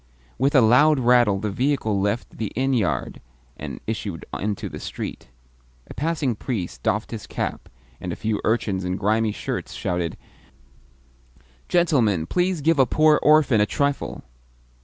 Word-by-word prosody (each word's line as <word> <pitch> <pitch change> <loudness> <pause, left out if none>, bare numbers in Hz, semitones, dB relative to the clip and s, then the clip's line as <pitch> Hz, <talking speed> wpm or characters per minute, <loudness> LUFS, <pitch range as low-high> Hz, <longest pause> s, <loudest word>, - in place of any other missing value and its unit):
With 140 +3 +2
a 130 - +7
loud 130 +7 +5
rattle 120 -5 +4
the 105 +1 -3
vehicle 110 -4 0
left 100 +4 -2
the 110 -3 -3
inn 135 +3 +1
yard, 110 -8 -1 0.3
and - - -7
issued 105 -6 -4
into 105 0 -3
the - - -8
street. - - -6 0.6
A - - -6
passing 150 -4 -1
priest 105 -5 -4
doffed 105 +3 -1
his 110 -4 -6
cap, - - -4 0.3
and 90 - -5
a - - -3
few 110 -1 -2
urchins 105 -4 0
in 90 0 -2
grimy 110 +2 +1
shirts - - -5
shouted, 85 -2 -2 1.5
"Gentleman, 125 - +2
please 180 - 0
give 160 0 +2
a 130 - +5
poor 155 +3 +4
orphan 150 -7 +5
a 105 - +3
trifle!" 140 0 -2
115 Hz, 150 wpm, -23 LUFS, 100-140 Hz, 1.5 s, a